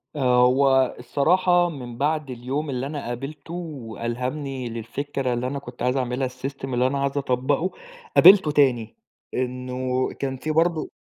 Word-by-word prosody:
آه. 125 -3 +4
هو 130 0 +3
الصراحة 175 +8 +2
من 125 -7 -8
بعد 150 +1 0
اليوم 130 +5 -3
اللي 130 0 -2
أنا 145 -3 -5
قابلته 135 +7 -6
وألهمني 130 -3 -4
للفكرة 130 +3 -3
اللي 120 +1 -2
أنا 140 +2 -3
كنت 125 -3 -12
عايز 125 +2 +1
أعملها 125 +1 -1
السيستم 130 +1 -5
اللي 125 +1 +2
أنا 140 +1 -1
عايز 140 +1 -1
أطبّقه، 140 +6 0 0.4
قابلته 185 -3 +8
تاني. 125 -7 +2 0.4
إنه 125 0 -2
كان 135 -1 -2
في 155 - -3
برضه 165 0 +1
130 Hz, 145 wpm, -24 LUFS, 125-145 Hz, 0.4 s, قابلته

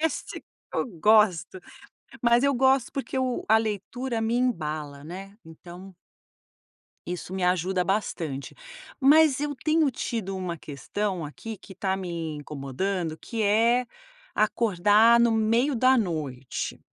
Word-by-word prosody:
Isso 320 0 -1
que - - -8 0.3
eu - - +1
gosto, 210 -3 +3 0.6
mas 235 +1 +4
eu 280 - +3
gosto 265 0 +3
porque 270 -1 -4 0.3
a 220 +1 +6
leitura 225 +3 -3
me 225 +1 0
embala, 155 - -2
né? 195 +5 -9
Então 175 +3 -12 1.1
isso 180 +1 -5
me 190 - -3
ajuda 180 +1 +1
bastante. 165 -8 -3 0.5
Mas 290 0 +5
eu 295 -1 -2
tenho 310 +1 +2
tido 220 -6 -4
uma 180 -2 -4
questão 170 +5 -4
aqui 220 +9 -7
que 190 - -14
tá 190 0 -1
me 170 -4 -4
incomodando 155 +4 -3
que 230 -2 -4
é 230 +4 +3 0.5
acordar 215 +1 +4
no 235 -1 +4
meio 230 +5 +2
da 255 +2 +4
noite. 150 - -4
205 Hz, 125 wpm, -26 LUFS, 175-235 Hz, 1.1 s, a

